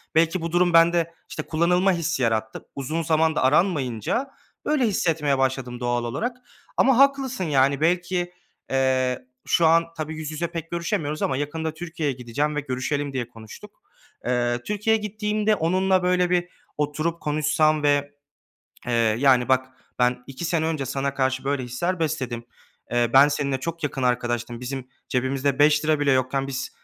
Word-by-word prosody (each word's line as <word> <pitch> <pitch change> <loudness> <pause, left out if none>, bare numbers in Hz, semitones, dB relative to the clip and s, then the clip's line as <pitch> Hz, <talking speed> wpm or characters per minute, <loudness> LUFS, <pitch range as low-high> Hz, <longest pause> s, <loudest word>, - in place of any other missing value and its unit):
belki 165 +2 +3
bu 165 0 -3
durum 175 0 +3
bende, 170 0 +4 0.2
işte, - - -5
kullanılma 180 +4 +2
hissi 165 -6 -1
yarattı. 110 -1 -1
Uzun 155 +4 -2
zamanda 160 -1 +2
aranmayınca, 145 - +1 0.4
böyle, 290 -5 +2
hissetmeye 160 -8 +1
başladım 130 -2 -1
doğal 120 -1 -1
olarak 230 - -3 0.4
ama 265 -2 +4
haklısın, 270 -4 +3
yani, 140 -3 +2
belki, 175 +1 0 0.4
eee, 130 -1 +1 0.2
şu 170 - +4
an 165 +1 +4
tabii 155 0 -4
yüz 155 -1 -5
yüze 165 +2 -2
pek 165 -1 -7
görüşemiyoruz 170 -3 -2
ama 130 - 0
yakında 160 +2 -3
Türkiye'ye 160 -4 -3
gideceğim 130 +5 -2
ve - - 0
görüşelim 140 +2 -2
diye 125 -3 -2
konuştuk. 110 -2 -13 0.4
Eee, 120 -1 0
Türkiye'ye 210 +1 +1
gittiğimde 210 0 0
onunla, 185 +2 +2
böyle, 180 0 +2
bir 175 0 +1 0.3
oturup 155 +3 -2
konuşsam 155 0 +1
ve, 145 0 +2 0.8
eee, 120 - -1 0.3
yani, 130 -2 +4
"Bak 130 0 +3 0.3
ben 125 0 +2
2 135 +5 -7
sene 165 -2 0
önce 155 -4 -2
sana 135 +1 -2
karşı 130 -1 0
böyle 140 -1 0
hisler 170 +9 -2
besledim. 130 -7 -2 0.5
Eee, 120 -1 +2
ben 140 +2 +8
seninle 140 -3 -1
çok 165 +3 -5
yakın 135 -2 -3
arkadaştım, 120 -1 -1
bizim 130 0 -5 0.2
cebimizde 130 +1 0
₺5 150 +1 +4
bile 140 -1 +3
yokken 130 +1 0
biz, 135 -1 -4
150 Hz, 155 wpm, -24 LUFS, 130-170 Hz, 0.8 s, ben